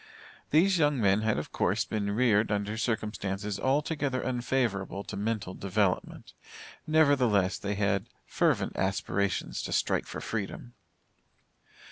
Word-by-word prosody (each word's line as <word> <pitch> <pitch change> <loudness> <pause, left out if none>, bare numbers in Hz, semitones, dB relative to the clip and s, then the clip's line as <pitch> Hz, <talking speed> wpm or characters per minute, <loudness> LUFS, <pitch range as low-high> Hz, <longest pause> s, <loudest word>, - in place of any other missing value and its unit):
These 180 +4 +4
young 145 -3 +3
men 100 -1 +3
had 110 -1 +1
of 75 - -4
course - - +1
been 105 -2 -2
reared 110 -3 +3
under 105 +1 -1
circumstances 105 -3 -2
altogether 140 -1 0
unfavorable 120 -6 -1
to - - -7
mental 105 -2 -2
development. 100 -1 -1 0.5
Nevertheless 130 -11 +3
they 100 0 -2
had 100 +1 0 0.2
fervent - - +1
aspirations 95 0 -1
to - - -5
strike - - +1
for - - -6
freedom. 115 +3 -5
105 Hz, 120 wpm, -29 LUFS, 100-130 Hz, 0.5 s, These